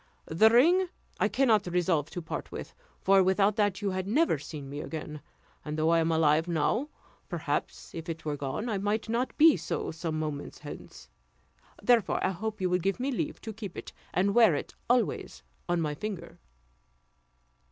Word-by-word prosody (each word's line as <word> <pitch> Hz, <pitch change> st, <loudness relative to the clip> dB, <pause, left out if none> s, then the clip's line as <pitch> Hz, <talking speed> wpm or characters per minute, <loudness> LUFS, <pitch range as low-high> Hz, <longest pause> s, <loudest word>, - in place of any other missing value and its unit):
The 195 Hz, +8 st, +5 dB
ring 340 Hz, +11 st, +5 dB, 0.3 s
I -, -, +3 dB
cannot 225 Hz, -7 st, +2 dB
resolve 175 Hz, -4 st, +1 dB
to 175 Hz, -, -6 dB
part -, -, -5 dB
with; -, -, -7 dB, 0.3 s
for 195 Hz, 0 st, +5 dB
without 195 Hz, +2 st, +3 dB
that 205 Hz, -1 st, +1 dB
you 200 Hz, -, +1 dB
had 185 Hz, 0 st, -3 dB
never 265 Hz, -, +2 dB
seen 145 Hz, -1 st, -8 dB
me 140 Hz, +2 st, -6 dB
again; 150 Hz, -2 st, -6 dB, 0.4 s
and 150 Hz, 0 st, -4 dB
though 160 Hz, +1 st, +2 dB
I 165 Hz, -, +4 dB
am 165 Hz, 0 st, +1 dB
alive 160 Hz, 0 st, +3 dB
now, 175 Hz, -, 0 dB, 0.4 s
perhaps, -, -, -3 dB
if 165 Hz, 0 st, -6 dB
it 160 Hz, -1 st, -5 dB
were 150 Hz, -1 st, -1 dB
gone, 140 Hz, -, -3 dB
I 210 Hz, -4 st, -1 dB
might 210 Hz, +3 st, -1 dB
not 240 Hz, +3 st, -1 dB
be 315 Hz, 0 st, +7 dB
so -, -, -3 dB
some 160 Hz, -1 st, -3 dB
moments 150 Hz, -2 st, -4 dB
hence; 145 Hz, -, -10 dB, 0.8 s
therefore, 240 Hz, -4 st, +3 dB
I 190 Hz, -, +2 dB
hope 215 Hz, +4 st, -4 dB
you 185 Hz, -, +1 dB
will 180 Hz, -, +3 dB
give 195 Hz, +6 st, -1 dB
me 265 Hz, +3 st, -1 dB
leave 245 Hz, -, -3 dB
to 220 Hz, -, -6 dB
keep 205 Hz, -4 st, -8 dB
it, -, -, -8 dB, 0.2 s
and 190 Hz, +3 st, +2 dB
to -, -, +1 dB
wear 225 Hz, -8 st, +6 dB
it -, -, -5 dB, 0.2 s
always 245 Hz, 0 st, 0 dB, 0.3 s
on 175 Hz, 0 st, +2 dB
my 150 Hz, -2 st, -1 dB
finger." 180 Hz, 0 st, -6 dB
185 Hz, 185 wpm, -29 LUFS, 160-220 Hz, 0.8 s, be